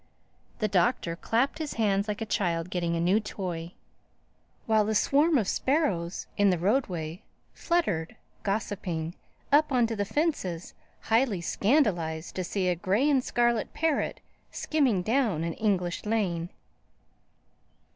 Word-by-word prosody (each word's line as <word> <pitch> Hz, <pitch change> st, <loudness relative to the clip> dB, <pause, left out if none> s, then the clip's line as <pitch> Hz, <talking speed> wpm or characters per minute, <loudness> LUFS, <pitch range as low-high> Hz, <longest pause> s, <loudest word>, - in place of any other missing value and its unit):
The 215 Hz, -, 0 dB
Doctor 180 Hz, -2 st, +1 dB
clapped 235 Hz, -, 0 dB
his 310 Hz, -2 st, -3 dB
hands 205 Hz, -2 st, +1 dB
like 210 Hz, +1 st, -3 dB
a -, -, -1 dB
child 175 Hz, -4 st, -1 dB
getting 170 Hz, -2 st, -1 dB
a -, -, -1 dB
new 180 Hz, +5 st, +3 dB
toy; 180 Hz, -5 st, -5 dB, 0.9 s
while 220 Hz, -1 st, +3 dB
the 215 Hz, +1 st, -1 dB
swarm 295 Hz, +7 st, +4 dB
of 215 Hz, -6 st, 0 dB
sparrows 195 Hz, -, 0 dB
in 205 Hz, -1 st, +4 dB
the 180 Hz, -, +2 dB
roadway 180 Hz, -, -1 dB, 0.3 s
fluttered, 205 Hz, -, -1 dB, 0.3 s
gossiping, 185 Hz, -5 st, -2 dB, 0.4 s
up 295 Hz, +1 st, +4 dB
on 250 Hz, -3 st, +4 dB
to 225 Hz, 0 st, -2 dB
the 205 Hz, -, 0 dB
fences, 200 Hz, -, -2 dB, 0.3 s
highly 225 Hz, -4 st, +2 dB
scandalized 175 Hz, -, +1 dB
to 185 Hz, -, -2 dB
see 185 Hz, +1 st, -1 dB
a 180 Hz, -, +3 dB
gray 200 Hz, -, +1 dB
and 275 Hz, -4 st, +3 dB
scarlet 240 Hz, -3 st, 0 dB
parrot 320 Hz, -3 st, 0 dB, 0.3 s
skimming 260 Hz, -, +1 dB
down 220 Hz, -, +1 dB
an 165 Hz, 0 st, -2 dB
English 185 Hz, -5 st, -1 dB
lane. 185 Hz, -6 st, -1 dB
205 Hz, 135 wpm, -28 LUFS, 175-240 Hz, 0.9 s, swarm